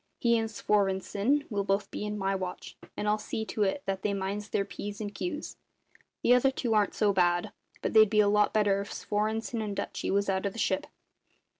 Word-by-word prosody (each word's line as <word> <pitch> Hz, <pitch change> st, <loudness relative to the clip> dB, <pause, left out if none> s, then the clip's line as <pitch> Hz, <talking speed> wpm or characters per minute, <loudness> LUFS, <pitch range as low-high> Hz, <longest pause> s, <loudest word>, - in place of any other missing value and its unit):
He 235 Hz, -2 st, +3 dB
and 225 Hz, 0 st, -2 dB
Svorenssen 205 Hz, +6 st, +1 dB
will 200 Hz, -1 st, 0 dB
both 195 Hz, 0 st, 0 dB
be -, -, -4 dB
in 210 Hz, 0 st, -3 dB
my 195 Hz, -1 st, 0 dB
watch, 185 Hz, -2 st, -5 dB, 0.2 s
and 210 Hz, -, -2 dB
I'll 210 Hz, +1 st, +2 dB
see 220 Hz, +1 st, -4 dB
to 215 Hz, -, -4 dB
it 205 Hz, +8 st, +1 dB
that 195 Hz, -1 st, -2 dB
they 200 Hz, -1 st, 0 dB
minds 200 Hz, +2 st, -3 dB
their 200 Hz, -, 0 dB
P's 205 Hz, +1 st, -7 dB
and 205 Hz, -1 st, -5 dB
Q's. 305 Hz, -, -5 dB, 0.7 s
The 245 Hz, -, +6 dB
other 250 Hz, +2 st, +5 dB
two 250 Hz, -3 st, -1 dB
aren't 210 Hz, -1 st, +2 dB
so 205 Hz, -2 st, +2 dB
bad; 175 Hz, +2 st, +2 dB, 0.3 s
but -, -, -1 dB
they'd 215 Hz, -2 st, +7 dB
be 215 Hz, -, +2 dB
a 210 Hz, -, +5 dB
lot 210 Hz, 0 st, +3 dB
better 205 Hz, -2 st, +2 dB
if 200 Hz, -, -7 dB
Svorenssen 220 Hz, +2 st, -2 dB
and 205 Hz, -2 st, -4 dB
Dutchy 200 Hz, -, -3 dB
was 200 Hz, +1 st, +1 dB
out 195 Hz, 0 st, 0 dB
of 195 Hz, -, -4 dB
the -, -, -10 dB
ship." 190 Hz, -4 st, 0 dB
205 Hz, 215 wpm, -29 LUFS, 195-220 Hz, 0.7 s, they'd